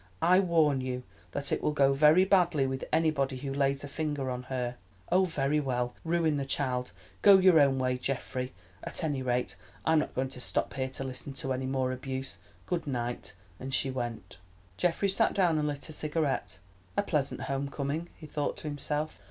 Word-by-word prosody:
"I 180 +2 +6
warn 160 -7 +3
you 125 -1 -3 0.3
that 140 -1 -2
it - - +1
will 150 - +1
go 140 -2 +4
very 155 +6 +6
badly 175 -7 +3
with 130 0 -3
anybody 155 -4 +1
who 135 +1 -4
lays 140 0 +1
a - - -5
finger 145 -3 -2
on 125 0 -3
her." 125 -2 -2 0.3
"Oh, 185 +1 +5
very 150 -3 +1
well, 125 -3 -1
ruin 165 -2 +1
the 140 - -1
child. 130 -2 -1 0.3
Go 200 -1 +9
your 185 -3 +6
own 140 -2 +4
way, 130 -1 0
Geoffrey! 130 0 -3 0.3
At - - -3
any 145 -4 0
rate 125 -6 -1 0.3
I - - +3
am 160 - +5
not - - -3
going 130 +1 0
to 125 -1 -8
stop - - -1
here 130 -1 -2
to 135 - -4
listen 130 +1 -5
to 135 -1 -2
any 130 0 -2
more 130 -1 0
abuse. 130 +1 -4 0.3
Good 175 -4 -2
night," 120 -3 -3 0.3
and 130 +1 -3
she 135 - 0
went. 120 -7 -5 0.4
Geoffrey 175 - +1
sat 205 +3 +2
down, 175 -5 +3
and 150 - 0
lit 145 -1 -4
a 155 - -8
cigarette. 150 -9 -1 0.4
"A - - +3
pleasant - - -1
home 140 +1 -2
coming," 145 +5 -3
he 155 - -11
thought 150 -1 -2
to - - -6
himself. 150 +1 -2
140 Hz, 200 wpm, -30 LUFS, 130-155 Hz, 0.4 s, Go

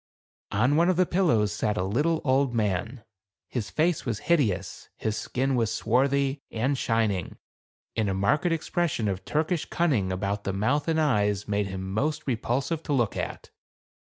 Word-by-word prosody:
On 125 +8 +2
one 170 +2 +4
of 185 - +3
the 185 +1 +3
pillows 155 - +2
sat 105 0 -1
a 90 - +1
little 145 - +1
old 130 -2 +2
man. 110 +3 -1 0.4
His 120 -5 -3
face 165 +1 +1
was 115 -4 -2
hideous, 100 - 0
his 110 -1 -2
skin 135 +4 -1
was 115 -4 +1
swarthy, 135 +4 +1
and 125 +5 0
shining, 110 -7 0 0.6
and 110 -3 +1
a 95 - -1
marked 145 - +2
expression 165 -7 0
of 95 -1 -2
Turkish 160 +2 0
cunning 130 - +1
about 100 +2 -2
the 95 - -2
mouth 130 +9 0
and 160 -1 +2
eyes 105 -9 +1
made 105 -1 0
him 95 0 -5
most 150 +7 -1
repulsive 135 +5 -1
to 150 - -2
look 120 -6 +1
at. - - -5
120 Hz, 165 wpm, -27 LUFS, 105-150 Hz, 0.6 s, one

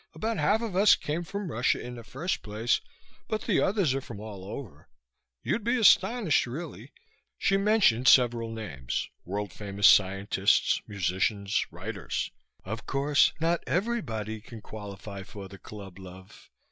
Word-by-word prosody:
About 225 0 -2
half 205 +9 +2
of 215 -6 -4
us 200 +2 +7
came 155 +3 -3
from 195 0 -5
Russia 120 +1 +1
in 125 - -7
the 120 -1 -9
first 145 +11 -3
place, 110 +3 0 0.5
but 215 -1 -2
the - - +2
others 190 -9 +2
are 135 - -1
from 115 -5 -9
all 105 -3 -8
over. 95 - -9 0.5
You'd 230 - -1
be 240 +3 +1
astonished, 205 - +4
really." 150 +9 -7 0.5
She 195 - +2
mentioned 195 - +3
several 120 -3 +5
names, 75 - -4 0.2
world 100 0 -4
famous 100 -1 -2
scientists, 100 +1 +3
musicians, 100 +2 0
writers. 95 +3 -4 0.3
"Of 110 +4 -6
course, 140 +1 +3
not 165 +1 +1
everybody 130 - -2
can 115 0 -10
qualify 100 -2 -8
for 95 0 -9
the 100 0 -12
club, 100 -3 -10
love. 95 0 -13
115 Hz, 145 wpm, -28 LUFS, -, 0.5 s, us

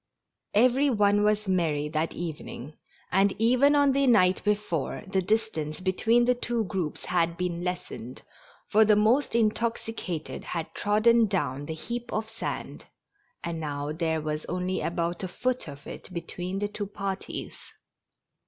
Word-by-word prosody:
Every 255 +6 +5
one 205 -3 +3
was 210 0 +2
very 190 -1 +1
merry 150 -4 0
that 155 +1 -1
evening, 155 -4 -6 0.4
and 195 +1 +3
even 255 +6 +4
on 285 -1 +5
the 275 0 +2
night 185 -6 +4
before 205 -8 -1
the 190 -1 0
distance 185 -7 -1
between 220 +6 +3
the 250 - +4
two 240 -2 -1
groups 185 -6 -3
had 170 -1 +1
been 175 -1 -2
lessened, 175 -9 -5 0.4
for 220 +1 +5
the 215 -1 +5
most 230 +6 +3
intoxicated 225 -6 -1
had 165 -2 -4
trodden 220 +2 +4
down 145 -8 -2
the 160 - -4
heap 240 +8 -5
of 220 +1 -2
sand, 225 - -5 0.6
and 170 -1 -3
now 145 -1 -3
there 160 0 -1
was 150 0 -3
only 180 +1 -2
about 170 0 -1
a - - -1
foot 255 +5 -2
of 145 0 -10
it - - -9
between 180 +2 -4
the 205 +1 0
two 205 0 -5
parties. 195 -1 -4
190 Hz, 155 wpm, -27 LUFS, 165-225 Hz, 0.6 s, Every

